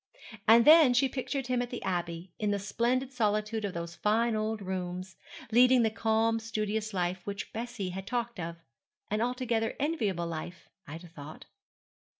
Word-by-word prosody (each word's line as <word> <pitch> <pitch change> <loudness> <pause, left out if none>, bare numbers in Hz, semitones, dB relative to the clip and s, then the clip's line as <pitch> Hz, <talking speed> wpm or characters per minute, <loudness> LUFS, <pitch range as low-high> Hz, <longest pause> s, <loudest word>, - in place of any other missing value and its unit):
And 230 +1 +7
then 305 -5 +8
she 270 +2 +4
pictured 270 +1 -3
him 250 0 0
at 245 - -3
the 245 - -6
Abbey, 175 -1 -3
in 210 - 0
the 205 - +1
splendid 240 +6 -1
solitude 215 -1 0
of 200 -3 -3
those 170 0 -5
fine 220 +5 +1
old 215 0 -1
rooms, 185 -1 -5 0.4
leading 250 +1 +6
the 220 - +2
calm, 225 +1 +1
studious 215 -1 -2
life 180 -1 -1
which 200 0 -5
Bessie 230 -4 -4
had 190 +2 -6
talked 235 -3 -2
of 165 0 -4 0.6
an 210 +1 0
altogether 240 -2 -1
enviable 220 - -1
life, 170 +2 -7 0.2
Ida 165 +4 -8
thought. 155 -2 -11
215 Hz, 160 wpm, -30 LUFS, 185-240 Hz, 0.6 s, then